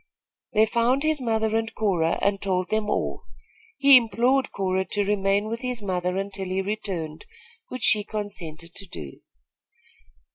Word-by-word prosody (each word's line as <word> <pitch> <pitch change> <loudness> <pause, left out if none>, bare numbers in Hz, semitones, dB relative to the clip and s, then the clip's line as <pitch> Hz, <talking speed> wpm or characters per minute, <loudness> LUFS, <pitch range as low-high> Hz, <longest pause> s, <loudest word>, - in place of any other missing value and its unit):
They 215 +1 +5
found 240 +5 +1
his 310 -2 +1
mother 220 -2 0
and 225 0 0
Cora 175 -6 +1
and 200 0 +1
told 185 -2 -1
them 215 -1 0
all. - - -1 0.6
He 280 -1 +8
implored 245 +4 +2
Cora 190 -1 0
to 205 +1 -1
remain 200 0 +1
with 230 +1 -3
his 250 -4 -4
mother, 180 -1 -1
until 195 0 -3
he 185 +1 -1
returned, 185 -7 -4 0.4
which 255 -1 -6
she 210 -1 +4
consented 180 -7 -6
to 200 0 -9
do. 75 - -9
205 Hz, 150 wpm, -25 LUFS, 190-225 Hz, 0.6 s, He